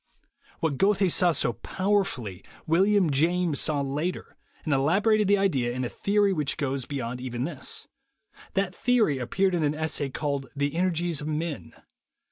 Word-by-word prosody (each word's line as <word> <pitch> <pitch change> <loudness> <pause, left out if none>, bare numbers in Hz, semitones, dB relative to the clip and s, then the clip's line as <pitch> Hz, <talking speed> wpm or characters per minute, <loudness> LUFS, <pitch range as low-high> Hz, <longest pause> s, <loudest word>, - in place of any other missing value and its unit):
What 145 -5 -1
Goethe 195 -2 +3
saw 180 -1 +4
so 125 -6 0
powerfully, 175 - -1 0.2
William 190 +1 +3
James 165 +2 +2
saw 150 -2 0
later, 145 +6 -3 0.3
and 155 - +1
elaborated 200 +10 +3
the 200 +1 +4
idea 135 -12 +1
in 130 +1 -3
a - - -3
theory 200 -1 +1
which 150 -5 -1
goes 135 -3 -2
beyond 125 -3 -4
even 125 -1 -3
this. 150 -2 -4 0.7
That 195 -2 0
theory 220 - +2
appeared 185 +10 0
in 175 - +1
an 150 0 +1
essay 155 -2 -2
called 140 -1 -3
"The 145 0 -1
Energies 170 -2 0
of 150 - -5
Men." 155 0 -4
155 Hz, 155 wpm, -26 LUFS, 135-190 Hz, 0.7 s, saw